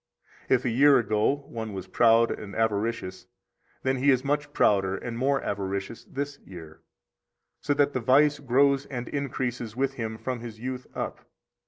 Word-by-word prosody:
70 - - +5
If - - -2
a - - +2
year 140 +1 +6
ago 115 +5 +1
one 110 -2 -6
was 95 -2 -5
proud 115 0 +4
and 100 -2 -6
avaricious, 110 -2 -1 0.6
then 130 0 +1
he 135 +3 +2
is 130 -2 +3
much 145 +1 -1
prouder 95 -7 +2
and 120 +2 -6
more 135 +3 +1
avaricious 100 +2 -4
this 140 +1 -5
year, 80 -4 -12 0.8
so 145 - 0
that 145 0 +2
the - - 0
vice 145 +4 +4
grows 140 +1 +2
and 125 -3 -5
increases 125 -5 -3
with 135 +1 0
him 110 -3 -4
from 125 +1 -4
his 115 -2 -9
youth 125 +1 -5
up. - - -5
125 Hz, 170 wpm, -27 LUFS, 110-140 Hz, 0.8 s, year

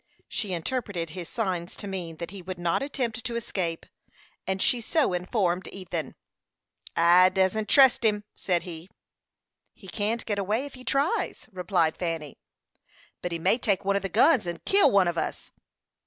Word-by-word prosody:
She 205 -4 -3
interpreted 175 -3 -3
his 175 -1 -7
signs 185 -7 -2
to - - -6
mean 175 -4 -5
that 170 +1 -6
he 200 -2 -8
would 185 +1 -6
not 175 +4 0
attempt 245 -5 -3
to 235 - -3
escape, 180 -7 -3 0.6
and 190 0 -1
she 240 +5 +2
so 280 - +1
informed 180 0 0
Ethan. 175 -6 -5 0.8
"I 175 +2 +6
dassent 190 +3 +1
trust 265 -3 +6
him," 210 -2 +2
said 175 -3 -1
he. 170 0 -9 0.9
"He 190 - -15
can't 215 +4 -2
get 205 -2 -1
away 215 +7 0
if 285 - -9
he 255 - -12
tries," 275 +6 0
replied 180 -3 0
Fanny. 165 -5 -4 0.8
"But 180 - -3
he 170 - -1
may 165 +9 +2
take 200 -5 0
one 200 0 +2
of 200 - +1
the 195 - -3
guns 255 - +4
and 170 0 -5
kill 395 +1 +5
one 195 -3 +4
on 170 -1 0
us." - - -5
190 Hz, 170 wpm, -27 LUFS, 175-225 Hz, 0.9 s, I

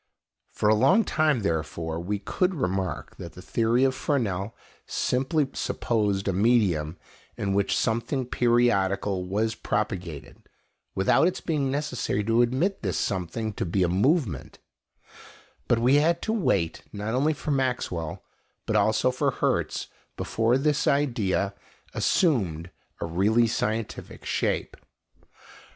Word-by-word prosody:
For 105 - -1
a 105 - +6
long 135 - +4
time, 155 - +1
therefore, 80 -2 -2
we 100 +5 -2
could 180 - -1
remark 95 - -3
that - - -8
the - - -11
theory 115 +3 +1
of 135 -1 +3
Fresnel 115 -7 -1 0.3
simply 135 +3 0
supposed 105 -4 -1
a 95 - +1
medium 95 -7 +2 0.4
in 100 -1 -1
which 100 0 +1
something 120 +4 0
periodical 100 -6 +1
was 110 +4 0
propagated, 95 -9 -4 0.5
without 95 - +4
its 185 - -2
being 145 -5 -1
necessary 130 -7 -1
to 115 +3 +3
admit 135 +12 +1
this 95 -5 -1
something 100 +3 -2
to - - -3
be 95 +2 +1
a - - +3
movement; 100 - 0 1.1
but 120 - +3
we 125 +5 +4
had 165 +3 +3
to 220 - 0
wait 95 - 0
not 105 +2 -4
only 145 +5 +2
for 150 +1 -4
Maxwell, 125 - -2 0.4
but 110 - -1
also 110 +4 +3
for 125 - 0
Hertz, - - -1 0.3
before 115 +3 +1
this 150 +2 +1
idea 115 -8 +1 0.4
assumed 90 - +1 0.3
a - - -1
really 100 +8 +2
scientific 110 -1 -3
shape. - - -1
110 Hz, 130 wpm, -26 LUFS, 95-130 Hz, 1.1 s, a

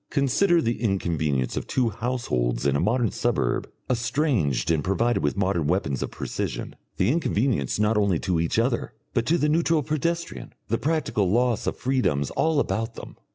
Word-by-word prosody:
Consider 155 +5 +2
the 115 -1 -1
inconvenience 80 - 0
of - - -4
two 125 -3 +1
households 70 - -1
in 70 -1 +2
a - - +2
modern 115 -1 +1
suburb - - 0 0.2
estranged 120 - +1
and 80 -3 +1
provided 115 +7 +1
with 75 +6 -1
modern 95 -6 +1
weapons 80 -6 0
of - - -2
precision, - - -4 0.2
the 95 +6 +3
inconvenience 125 - 0
not 105 +1 +2
only 100 -4 +2
to 90 -3 0
each 85 +4 0
other, 115 +1 0 0.2
but 120 -2 0
to 170 - +3
the 150 - +1
neutral 160 0 +2
pedestrian, 165 +3 -3 0.2
the 115 - 0
practical 150 - 0
loss 120 +2 +1
of - - -1
freedoms 120 - 0
all 160 -2 +1
about 115 -2 -1
them. - - -9
115 Hz, 170 wpm, -25 LUFS, 85-135 Hz, 0.2 s, the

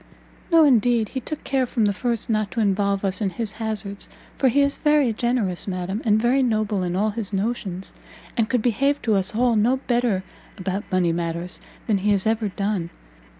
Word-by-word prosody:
"No 330 -1 +7
indeed; 240 -5 +3
he 265 - -3
took 300 +4 -6
care 265 -2 0
from 230 -3 +1
the 205 - +2
first 235 +1 -2
not 215 -2 0
to 230 - -4
involve 200 -1 +1
us 195 +3 -1
in 200 - +1
his 220 +2 -4
hazards, 215 -3 -4 0.3
for 270 - +2
he 280 +4 +3
is 280 0 +1
very 295 -6 +3
generous, 220 -6 -1
madam, 190 +3 -3
and 215 -2 +3
very 245 +4 +3
noble 215 -5 0
in 180 -1 -2
all 210 +3 +1
his 210 -2 -4
notions, 195 -2 -3 0.4
and 230 -2 +1
could 245 -3 +1
behave 275 +5 +2
to 220 - +2
us 195 +1 +1
all 240 0 +3
no 235 +5 +3
better 240 -7 0 0.3
about 190 +2 -4
money 180 -2 +2
matters 170 +1 -3 0.3
than 210 -4 +1
he 205 +2 0
has 195 0 0
ever 220 0 +1
done. 195 -3 -2
215 Hz, 195 wpm, -23 LUFS, 195-240 Hz, 0.4 s, No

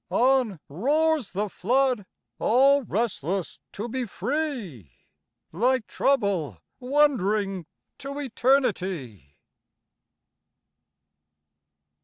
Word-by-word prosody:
On 250 -7 +2
roars 285 - +1
the 205 +3 -1
flood, 245 +2 0 0.3
all 275 +4 +4
restless 195 - -2
to 210 +4 -4
be 255 +1 -3
free, 210 - -4 0.6
Like 240 +6 +1
Trouble 200 - 0 0.2
wandering 215 - +1 0.3
to 280 +1 -6
Eternity. 190 - -1
230 Hz, 70 wpm, -25 LUFS, 185-270 Hz, 0.6 s, all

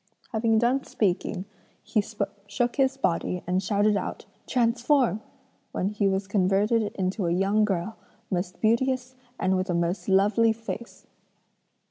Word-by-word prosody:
"Having 225 -1 +2
done 245 +4 +2
speaking, 185 -2 -1 0.4
he 215 - +1 0.5
shook 240 +4 -1
his 270 -1 +2
body 180 -5 -1
and 185 +2 +1
shouted 205 +1 +2
out 195 - -4 0.2
'transform,' 240 - +2 0.5
when 190 - 0
he 210 -1 0
was 195 0 0
converted 200 +3 +2
into 190 0 -1
a - - +1
young 195 +4 +2
girl, 195 +2 -2 0.3
most 180 0 -2
beauteous 255 +3 +1 0.3
and 190 0 +2
with 185 +1 -1
a 175 - +1
most 170 +4 -1
lovely 210 +4 +4
face. 230 +1 -8
210 Hz, 135 wpm, -26 LUFS, 190-230 Hz, 0.5 s, lovely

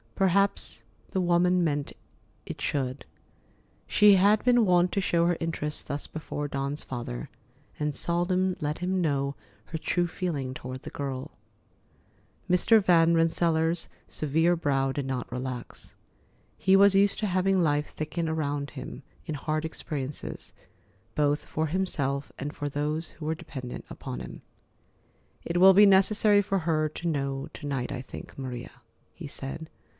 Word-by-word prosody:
Perhaps 195 +1 +1 0.3
the 190 - 0
woman 180 +1 +3
meant 145 -3 -1 0.5
it - - -7
should. 130 -1 -2 0.8
She 210 -1 +6
had 205 +3 +4
been 245 -2 +5
wont 180 -1 +4
to 200 - 0
show 170 -2 +2
her 175 -1 +2
interest 160 -3 -3
thus 140 +1 -3
before 150 -2 -5
Dawn's 140 +1 -3
father, 120 - -5 0.5
and 150 -1 0
seldom 180 +3 0
let 150 -1 -2
him 185 +1 0
know 140 -3 0 0.3
her 160 - -5
true 175 +2 +1
feeling 160 -7 -3
toward 130 0 -7
the - - -7
girl. 135 -2 -4 1.2
Mr. 210 +5 +5
Van 170 -2 +5
Rensselaer's 165 0 +2 0.2
severe 160 +4 +2
brow 135 -4 +1
did 140 0 -3
not 130 -2 -3
relax. 125 -1 -6 0.6
He 190 0 +4
was 200 0 +7
used 200 +1 +4
to 215 - 0
having 185 0 +2
life 150 -1 +1
thicken 160 +2 -3
around 145 -3 -2
him 130 -1 -8 0.2
in 155 - -3
hard 155 +2 -2
experiences, 145 -3 -5 0.6
both 145 0 +1
for 160 +1 -1
himself 145 -6 -1
and 145 +2 -4
for 145 - -3
those 150 +3 -2
who 155 - -10
were 160 +1 0
dependent 135 -7 -7
upon 60 - -6
him. - - -8 1.0
"It 170 - -1
will 190 +1 +9
be 205 +2 +8
necessary 205 +1 +5
for 195 0 0
her 155 -2 +1
to 165 +3 -5
know 140 -3 -2
to - - -9
night, 135 -3 -2
I 125 - -4
think, 130 - -10
Maria," 130 -1 -6 0.4
he 165 - -8
said. 140 +3 -7
160 Hz, 150 wpm, -28 LUFS, 140-180 Hz, 1.2 s, will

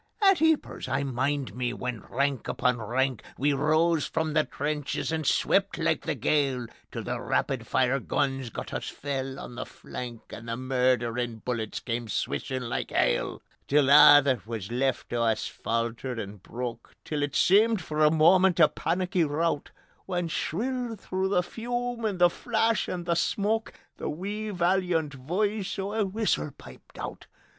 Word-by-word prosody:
At 390 -4 +5
Eepers 320 -1 +1
I 140 - 0
mind 135 +1 -1
me 125 -1 -1
when 125 -3 -4
rank 140 -1 0
upon 125 -2 +1
rank 130 +3 0 0.2
We 145 +2 +2
rose 155 +3 +2
from 160 -1 -1
the 155 -1 +4
trenches 150 +1 -2
and 160 -3 -1
swept 195 0 +2
like 165 -1 +1
the 160 - 0
gale, 135 -1 +1 0.3
Till - - -5
the - - -3
rapid - - -1
fire 130 +2 +2
guns 135 -4 -1
got - - -7
us - - -3
fell 135 -1 -4
on - - -8
the 125 +1 -5
flank 120 -2 -8
And 115 0 -8
the 115 - -2
murderin' 125 -3 0
bullets 115 -4 -2
came 120 -1 -3
swishin' 130 +4 -2
like - - -2
hail: - - 0 0.2
Till 140 -1 +4
a' 145 0 +9
that 130 -6 0
were 115 -1 -3
left 130 0 -1
o' 120 - +1
us 110 -2 +1
faltered 115 +2 -3
and 100 -3 -6
broke; 120 +2 -6
Till 150 -2 -2
it 145 -1 -2
seemed 215 +3 +5
for 155 -3 -1
a 150 - +7
moment 175 +3 +5
a 155 - +8
panicky 180 +1 0
rout, 155 0 0 0.4
When 175 -3 -1
shrill 240 +8 -2
through 190 -1 -2
the 180 -2 +2
fume 240 +3 -3
and 205 -3 -1
the 175 -1 +5
flash 225 +1 0
and 175 -1 -4
the 170 - +2
smoke 210 +6 0 0.2
The - - -3
wee 205 +7 -4
valiant 175 -4 +1
voice 195 +10 -2
o' 195 +1 -3
a 220 -2 +1
whistle 195 - 0
piped - - -14
out. - - -7
145 Hz, 165 wpm, -27 LUFS, 125-185 Hz, 0.4 s, a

